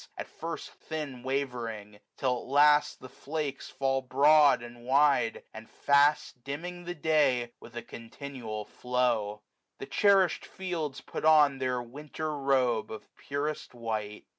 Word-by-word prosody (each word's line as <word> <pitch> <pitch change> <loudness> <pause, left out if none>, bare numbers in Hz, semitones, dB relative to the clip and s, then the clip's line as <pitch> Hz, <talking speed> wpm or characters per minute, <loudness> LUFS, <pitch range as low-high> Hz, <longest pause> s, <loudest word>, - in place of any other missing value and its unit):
At - - -5
first 165 +1 -7
thin 150 -6 -6
wavering; 120 -6 -4 0.2
till 130 -2 +1
at - - -11
last 150 +2 +4
the 130 - -9
flakes 140 +1 -5
23a - - -16
Fall 135 -1 +1
broad, 140 0 +5
and 120 0 -11
wide, 135 -2 +2
and 110 0 -11
fast, 140 0 +2
dimming 175 +5 -6
the 175 +1 -5
day. 145 -7 +2
With 120 - -14
a 120 - -5
continual 115 -3 -7
flow. 120 -5 -1 0.3
The - - -7
cherishM 195 -3 +3
fields 165 -7 -4
Put - - -7
on 150 -3 +5
their 125 -1 -1
winter 150 +4 -6
robe 130 -5 +1
of 110 - -10
purest 145 -1 -4
white. 110 -3 -4
135 Hz, 140 wpm, -29 LUFS, 120-150 Hz, 0.3 s, broad